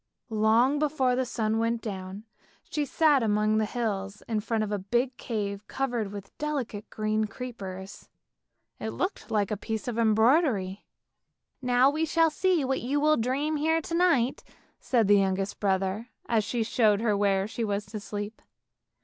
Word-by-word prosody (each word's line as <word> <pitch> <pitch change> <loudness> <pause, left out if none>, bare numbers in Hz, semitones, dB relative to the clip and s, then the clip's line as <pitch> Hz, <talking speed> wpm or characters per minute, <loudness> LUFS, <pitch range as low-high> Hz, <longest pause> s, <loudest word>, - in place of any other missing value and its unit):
Long 225 +6 +3
before 275 -4 +1
the 255 0 0
sun 220 -1 0
went 230 +1 0
down, 195 -2 -6 0.4
she 300 -1 -2
sat 295 -1 +3
among 215 0 +2
the 215 - +1
hills 205 -4 -3
in 220 -2 0
front 220 +1 -1
of 210 - -4
a 205 - -1
big 240 +6 0
cave 205 -4 -4
covered 240 -7 -2
with 200 -1 -9
delicate 270 -9 -3
green 215 0 0
creepers. 200 -5 -8 0.7
It 110 - -3
looked 115 - -3
like 205 -2 0
a 210 - -1
piece 220 +3 -4
of 235 -1 -2
embroidery. 220 - +2 0.4
" - - -56
Now 250 +1 +4
we 315 +2 0
shall 330 0 +3
see 350 -2 +1
what 265 0 -1
you 275 +4 0
will 305 +1 +4
dream 280 +6 0
here 320 +2 +2
to 325 - -7
night," 310 -8 +2 0.4
said 235 -5 +2
the 205 0 +6
youngest 195 0 -1
brother, 195 +2 0 0.2
as 220 -3 +1
he 235 -2 +1
showed 220 -2 +2
her 215 -3 +2
where 200 -1 +2
she 230 +1 -4
was 205 -1 -1
to 215 +2 -6
sleep. 205 +1 -6
220 Hz, 170 wpm, -28 LUFS, 205-260 Hz, 0.7 s, the